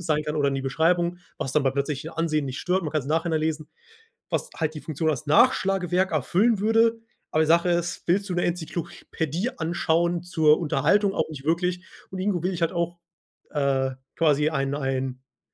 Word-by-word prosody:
sein 155 -3 0
kann 150 0 -3
oder 140 -1 +2
in 135 - -1
die 135 - -2
Beschreibung, 170 +5 +1 0.2
was 135 - -3
dann 150 0 +3
beim 135 -1 +1
plötzlichen 140 +2 -2
Ansehen 160 -2 0
nicht 130 +2 -5
stört. 185 +1 0
Man 155 -2 -4
kann's 155 -4 0
im 150 - -4
Nachhinein 160 0 +1
lesen, 155 -1 -2 0.6
was - - -2
halt 160 -1 -1
die 150 - -6
Funktion 160 +1 -1
als 155 0 -2
Nachschlagewerk 190 - +3
erfüllen 190 - +2
würde. 225 +2 +3 0.3
Aber 155 - +2
die 155 - -1
Sache 170 +2 +4
ist, 175 0 -1
willst 195 +3 +1
du 180 - -1
'ne 175 - +1
Enzyklopädie 170 - -3
anschauen 170 +1 0
zur 155 -3 +3
Unterhaltung? 175 +6 +2
Auch - - -1
nicht 145 -4 -8
wirklich. 180 +2 0 0.3
Und 190 - -5
irgendwo 185 -2 0
will 185 +1 0
ich 170 - -5
halt 165 - +2
auch, 170 0 -2 0.5
äh, 135 -2 +1 0.3
quasi 150 -2 +3
ein 135 -2 -1
ein 135 -2 -4
160 Hz, 195 wpm, -25 LUFS, 150-175 Hz, 0.6 s, Sache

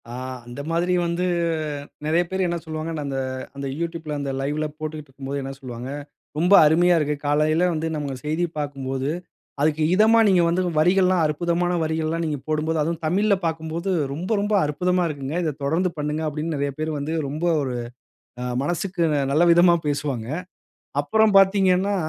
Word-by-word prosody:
ஆ - - -7 0.3
அந்த 120 +4 -7
மாதிரி 175 +2 +1
வந்து 170 +2 -1 0.8
நிறைய 160 +3 +3
பேரு 190 0 0
என்ன 170 0 -1
சொல்வாங்கன்னா 155 -1 -4
அந்த, 135 -1 -3 0.4
அந்த 140 0 -4
யூட்யூப்ல 165 -2 -3
அந்த 140 -1 -2
லைவ் 145 +2 -2
ல 155 - 0
போட்டுக்கிட்டு 155 -2 -6
இருக்கும்போது 140 +1 -5
என்ன 135 0 -5
சொல்வாங்க, 125 -2 -7 0.5
"ரொம்ப 175 +5 +3
அருமைய 170 +3 +4
இருக்கு. 150 -1 0
காலையில 155 +4 +2
வந்து 160 0 -2
நம்ம 145 -3 -3
செய்திய 165 +3 0
பார்க்கும்போது 135 -1 -3 0.5
அதுக்கு 155 +1 +2
இதமா 220 +4 +5
நீங்க 185 -3 +5
வந்து 170 +2 +1 0.2
வரிகள் 180 +4 +4
எல்லாம் 185 -1 +3
அற்புதமான 170 +3 0
வரிகள் 160 0 -1
எல்லாம் 165 +1 -1
நீங்க 150 -2 -1
போடும்போது 155 +1 0
அதுவும் 165 +2 -2
தமிழ்ல 200 +6 +2
பார்க்கும்போது 160 +3 -3 0.2
ரொம்ப, 165 +7 -5
ரொம்ப 205 +1 -1
அற்புதமா 180 +5 +1
இருக்குங்க. 145 -1 -4
இத 155 -2 -1
தொடர்ந்து 165 +6 +1
பண்ணுங்க!" 150 +1 -2
அப்பிடின்னு 155 +2 -3
நிறைய 140 0 -1
பேரு 155 0 -1
வந்து 145 +3 -3
ரொம்ப 150 +4 -5 0.2
ஒரு 130 -2 -3 0.7
அ - - -2 0.2
மனசுக்கு 175 +3 -2 0.3
நல்ல 150 +4 +3
விதமா 175 +1 +6
பேசுவாங்க. 140 -5 -2 0.8
அப்புறம் 220 +8 +3
பார்த்தீங்கன்னா, 195 0 +4
160 Hz, 165 wpm, -23 LUFS, 145-175 Hz, 0.8 s, விதமா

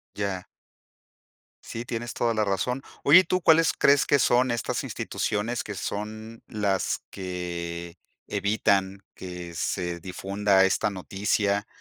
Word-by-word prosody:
Ya. 100 -3 -2 1.2
Sí, 115 - -6
tienes 120 0 -4
toda 115 -1 +1
la 110 -1 +1
razón. 125 +7 -1 0.2
Oye, 155 +6 +9
¿y - - +4
tú, 185 +2 0
¿cuáles 165 0 +5
crees 140 0 +4
que 145 - +4
son 125 0 +3
estas 120 - -2
instituciones 110 +4 -2
que 105 - -6
son 110 +3 -5
las 100 -3 -1
que 85 -2 -5 0.3
evitan 100 -2 +1
que 90 -2 -7
se 85 +2 -2
difunda 95 +2 +1
esta 95 - +1
noticia 100 +1 -1
100 Hz, 125 wpm, -26 LUFS, 95-115 Hz, 1.2 s, Oye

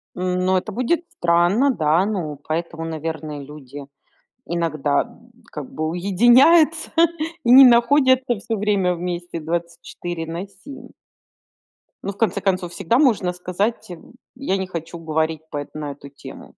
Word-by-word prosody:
Ну, 185 +1 0
это 185 - -4
будет 255 +9 0 0.2
странно, 175 +11 +3
да. 160 -2 +2
Ну, 170 -9 -3
поэтому, 165 +1 -3
наверное, 155 -2 -5
люди 140 -1 -10 0.6
иногда, 155 -4 0
м, 240 0 -19 0.2
как 150 -3 -8
бы 155 0 -3
уединяются 240 - +4 0.5
и 235 - +3
не 265 +1 +10
находятся 255 0 +4
всё 225 +2 -3
время 195 -3 +1
вместе 175 0 -5
24 170 +1 -5
на 170 +4 -5
7. 205 +9 -13 1.1
Но 200 - -3
в - - -23
конце 200 -3 0
концов 185 -3 -1
всегда 195 +5 0
можно 215 -11 +2
сказать: 185 +6 -3
"М, 175 +4 -12 0.2
я 235 -8 -1
не 190 -1 -3
хочу 170 -1 -7
говорить 160 0 -1
по 145 -1 -5
на 150 -1 -5
эту 140 0 -12
тему". 140 - -12
180 Hz, 140 wpm, -21 LUFS, 160-220 Hz, 1.1 s, не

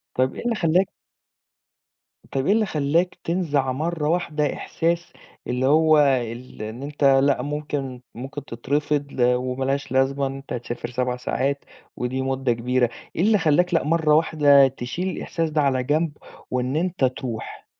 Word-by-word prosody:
طَب 130 +1 +1
إيه - - -6
اللي 240 -1 +1
خلّاك 180 0 +2 1.4
طَب 135 0 -1
إيه 200 - +4
اللي 220 -1 +2
خلّاك 160 +2 0
تنزَع 150 -7 0
مرّة 155 +2 -2
واحدة 155 -4 0
إحساس 170 +1 -2 0.3
اللي 125 +1 0
هو 155 +2 +5
ال 125 -4 0
إن 110 +5 -6
أنت 145 0 -5
لا 135 -1 +4
ممكن 145 -3 -4
ممكن 135 +3 -7
تترفض 145 +4 -2
وما 125 +1 +1
لهاش 140 0 -1
لازمة 135 +1 +2
إن 135 - -5
أنت 135 0 -8
تسافر 120 0 -5
7 125 0 -1
ساعات 135 +3 -1 0.3
ودي 130 +2 -2
مُدّة 130 -2 0
كبيرة. 125 +1 +1 0.3
إيه - - 0
اللي 210 +2 +4
خلّاك 175 +1 +2
لأ 165 - +3
مرّة 155 0 +2
واحدة 145 -4 +5
تشيل 135 +7 -4
الإحساس 165 -3 -2
ده 155 0 +1
على 130 -3 +1
جنب 150 +3 0 0.3
وإن 125 +2 -1
أنت 170 -3 +1
ترُوح؟ 125 -3 -5
140 Hz, 155 wpm, -23 LUFS, 130-160 Hz, 1.4 s, هو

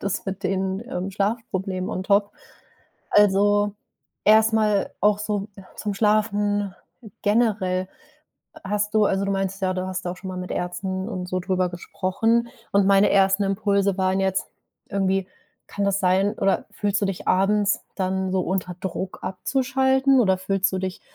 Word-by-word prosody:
das 200 0 -2
mit 195 +1 -4
den, 190 +1 -1
ähm, 185 -5 -3
Schlafproblemen 195 -2 -2
on 185 - -3
top. 200 0 +2 0.8
Also, 205 0 +4 0.5
erstmal 215 -1 +4
auch 210 0 +3
so 210 -1 -2 0.3
zum 205 -1 -3
Schlafen 205 -1 +1 0.5
generell. 205 -4 +1 0.8
Hast 210 +2 -1
du 215 -1 +5
also, 195 +1 0
du 200 - 0
meintest 195 0 -2
ja, 185 0 +1
du 185 0 -3
hast 185 0 -4
da 175 - -1
auch - - -11
schon 190 +1 -8
mal 185 - -5
mit 180 0 -6
Ärzten 185 +2 -3
und 185 -5 -4
so 185 0 -1
drüber 185 -1 0
gesprochen 225 +6 0 0.2
und 200 -1 +4
meine 200 +1 +5
ersten 195 +1 +3
Impulse 200 -1 +1
waren 190 0 +1
jetzt 190 0 0 0.4
irgendwie: 195 -1 0 0.4
Kann 200 - -3
das 200 0 +1
sein, 190 +2 +2
oder 195 0 +1
fühlst 205 0 -1
du - - +3
dich 195 -2 -5
abends 200 +2 +2
dann 190 0 -1
so 190 - +2
unter 180 -1 -2
Druck, 190 0 -5
abzuschalten, 265 +6 +2
oder 190 -5 +3
fühlst 195 0 0
du 190 - -1
dich 185 -1 -4
195 Hz, 160 wpm, -23 LUFS, 185-205 Hz, 0.8 s, du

